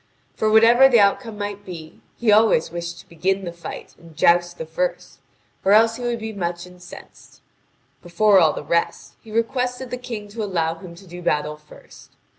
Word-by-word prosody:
For, 215 - 0
whatever 230 +4 +6
the 240 -3 +5
outcome 210 +2 +1
might 205 0 -5
be, 165 -5 -10 0.2
he 235 -3 +2
always 210 -7 +4
wished 170 0 -6
to - - -25
begin 190 +4 -2
the 170 - -6
fight 170 - -9
and 165 -2 -16
joust 175 0 +3
the 160 - -6
first, 175 +3 -4 0.4
or 195 - +4
else 225 +1 +4
he - - -9
would 240 -1 -1
be 220 -1 -6
much 175 -3 -4
incensed. 180 -1 -15 0.6
Before 195 +3 +3
all 160 -4 +4
the - - -6
rest, 170 +3 -2
he 225 - -16
requested 250 +2 -2
the 250 - -3
King 235 -4 -7
to 220 +2 -6
allow 170 -5 -1
him 170 0 -12
to 195 +3 -15
do 180 0 -10
battle 150 -2 -1
first. 150 0 -17
195 Hz, 190 wpm, -21 LUFS, 170-220 Hz, 0.6 s, whatever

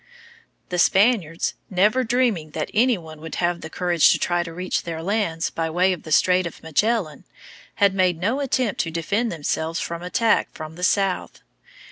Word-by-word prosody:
The 180 -2 -2
Spaniards, 190 -5 +2 0.2
never 210 +7 +2
dreaming 225 -10 0
that 155 - -3
any 240 +1 +3
one 160 -3 -11
would 165 0 -7
have 175 0 -1
the 160 - -7
courage 175 -1 +3
to - - +2
try 175 -1 0
to 170 -1 -6
reach 180 +2 -2
their 165 -1 -6
lands 185 -4 -1
by 165 -1 -2
way 180 +3 +2
of 175 - -7
the 155 - -10
Strait 180 +3 +3
of 170 - -11
Magellan, 175 0 0 0.5
had 200 -1 +3
made 185 -3 +2
no 225 +10 0
attempt 255 -6 0
to 165 - -3
defend 200 +8 -1
themselves 160 +1 -2
from 170 0 -4
attack 215 +5 +1
from 155 0 -8
the 180 - -8
south. 195 0 0
180 Hz, 180 wpm, -23 LUFS, 165-205 Hz, 0.5 s, any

